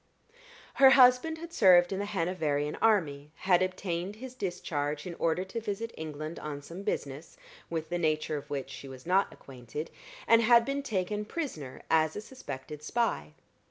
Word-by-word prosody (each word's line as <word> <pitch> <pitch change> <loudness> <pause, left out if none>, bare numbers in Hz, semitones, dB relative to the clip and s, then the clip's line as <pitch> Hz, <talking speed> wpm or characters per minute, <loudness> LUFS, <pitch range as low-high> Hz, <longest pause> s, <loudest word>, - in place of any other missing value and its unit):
Her 270 - +10
husband 260 +4 +6
had 335 +1 -9
served 180 -2 +6
in 190 - -2
the 205 - -2
Hanoverian 160 -6 -1
army, 150 -10 +2
had 185 -2 +3
obtained 185 0 -2
his 255 +3 -9
discharge 150 - -3
in 180 - -5
order 165 +2 +1
to 190 +5 -5
visit 225 +2 -4
England 155 +1 -6
on 145 -1 -6
some 170 +6 -8
business, 145 -5 -4 0.3
with 160 -1 -3
the 175 0 -1
nature 155 -1 0
of 145 0 -6
which 140 -2 -4
she 140 - -9
was 130 -1 -11
not 190 +3 +2
acquainted, 130 +4 -8 0.4
and 230 0 +6
had 235 0 +6
been 275 +2 -1
taken 210 -4 -2
prisoner 210 - -6
as 160 -1 +3
a 210 - -4
suspected 150 - -8
spy. 235 +8 -1
175 Hz, 165 wpm, -30 LUFS, 150-215 Hz, 0.4 s, Her